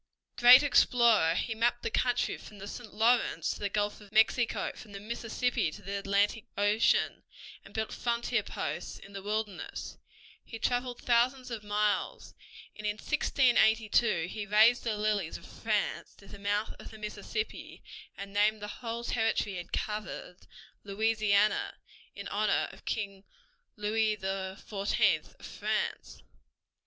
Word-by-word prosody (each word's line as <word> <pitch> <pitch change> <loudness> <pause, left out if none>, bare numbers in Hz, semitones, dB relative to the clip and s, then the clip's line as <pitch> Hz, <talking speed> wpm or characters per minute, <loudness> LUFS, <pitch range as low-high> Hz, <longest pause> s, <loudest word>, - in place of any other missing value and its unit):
Great 250 +3 +9
explorer, 235 - +4
he 225 - -1
mapped 240 +2 0
the - - -2
country 245 -1 +1
from 210 - -12
the 200 +1 -8
St. 225 +1 -8
Lawrence 230 +3 +2
to - - -6
the 205 - -2
Gulf 205 +1 -1
of 205 -1 -15
Mexico, 225 +2 +2
from 210 - -13
the 200 - -6
Mississippi 235 -1 -1
to 205 +6 -11
the 200 +1 -3
Atlantic 200 +2 +1
Ocean, 205 +2 +2 0.4
and - - -15
built 220 0 -3
frontier 235 -1 0
posts 170 -3 -5
in 200 - -14
the 195 - -6
wilderness. 210 -1 -4 0.4
He 225 - -8
traveled 245 +2 -1
thousands 250 +2 +2
of 220 -2 -5
miles, 210 0 -1 0.4
and 215 0 -5
in 210 - 0
1682 225 - +2
he 205 +2 -6
raised 220 +4 +5
the 220 -3 -1
lilies 210 -5 -1
of - - -15
France 215 -3 -2
near 195 - -15
the 200 - -10
mouth 205 +2 -1
of - - -10
the 220 - -12
Mississippi 215 - -5 0.3
and 200 0 -8
named 210 +1 +3
the 210 +3 -8
whole 235 0 -4
territory 225 -3 0
he 185 - -5
had 175 - -8
covered 210 -4 -5 0.4
Louisiana, 215 0 +1 0.4
in - - -7
honor - - +1
of - - -16
King 200 -3 -3 0.5
Louis 215 +1 +1
XIV 195 +1 -1
of - - -11
France. - - -3
215 Hz, 145 wpm, -30 LUFS, 200-235 Hz, 0.5 s, Great